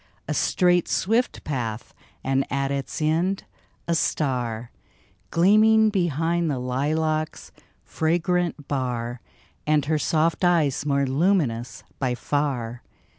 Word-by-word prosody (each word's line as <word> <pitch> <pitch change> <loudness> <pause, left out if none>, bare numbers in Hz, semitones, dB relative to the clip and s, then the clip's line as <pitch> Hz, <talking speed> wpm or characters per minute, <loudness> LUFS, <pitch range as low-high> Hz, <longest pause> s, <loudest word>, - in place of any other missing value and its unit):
A - - -1
straight, 180 -2 +2
swift 210 - 0
path 120 -6 -4 0.2
— - - -35
and 135 +1 0
at 140 0 0
its 140 +2 -3
end, 170 +5 +1 0.4
a 170 - +1
star 125 -7 -1 0.6
Gleaming 215 +5 +5
behind 170 -2 0
the 140 - -1
lilac's 155 +5 -1 0.3
fragrant 170 -1 -1
bar, 125 -3 -3 0.5
And 150 -2 +3
her 155 +1 +1
soft 160 +3 +1
eyes, 155 -5 +2
more 140 -1 +2
luminous 135 - 0 0.2
by 130 -3 0
far 125 -4 -2
150 Hz, 115 wpm, -24 LUFS, 130-170 Hz, 0.6 s, Gleaming